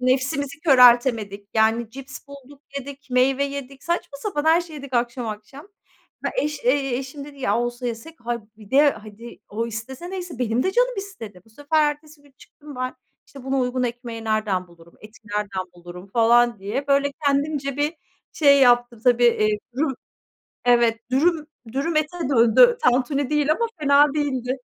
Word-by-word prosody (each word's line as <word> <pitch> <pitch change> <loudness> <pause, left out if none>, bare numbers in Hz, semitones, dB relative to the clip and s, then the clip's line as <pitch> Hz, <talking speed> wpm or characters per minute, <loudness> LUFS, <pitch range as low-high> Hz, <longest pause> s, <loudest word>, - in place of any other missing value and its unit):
Nefsimizi 270 +4 0
köreltemedik 240 - +4
yani; 225 +1 +2
cips 270 +2 -9
bulduk 280 +1 -14 0.2
yedik, 275 0 -10
meyve 260 +2 +2
yedik, 275 -1 -7
saçma 340 -4 -3
sapan 305 -5 -3
her 325 +2 +5
şeyi 330 -3 -9
yedik 280 -2 -10
akşam 240 0 -1
akşam. 245 - -9 0.6
He, - - -1
eş 300 -1 -4
,eee, 265 0 +1
eşim 270 +1 -7
dedi 285 -1 -13
ya 210 -2 +1
olsa 240 +1 -3
yesek; 235 +8 -6
hayır, 240 0 -3 0.2
bir 215 -2 -16
de 285 +2 +5
hadi 220 0 -11
o 225 +3 -3
istese 255 - -7
neyse, 360 -7 -6
benim 240 0 0
de 380 - 0
canım - - +2
istedi. 230 - -8
Bu - - -22
sefer 295 +5 +1
ertesi 295 0 -12
gün 280 -2 -24
çıktım 295 -2 -14
ben, 255 0 -3 0.3
işte 275 -2 -13
buna 270 0 0
uygun 250 0 -1
ekmeği 235 -2 -5
nereden 210 -5 -1
bulurum, 170 0 -19
eti 215 0 -15
nereden 205 -3 -3
bulurum 175 +2 -11
falan 235 +1 +3
diye. 240 +9 -3
Böyle 280 0 +2
kendimce 280 -1 0
bir 295 +3 0 0.4
şey 280 -3 +5
yaptım 240 -2 +3
tabii. 245 -1 +4
Eee, 215 -3 +3 0.2
dürüm 275 -1 0 0.7
evet, 235 -2 +3
dürüm, 305 +3 +2 0.3
dürüm 305 +4 -1
ete 310 +3 0
döndü, 275 - +5
tantuni 260 +3 +1
değil 300 0 +2
ama 465 +9 0
fena 285 0 +4
değildi. 260 -4 -1
260 Hz, 170 wpm, -23 LUFS, 235-290 Hz, 0.7 s, her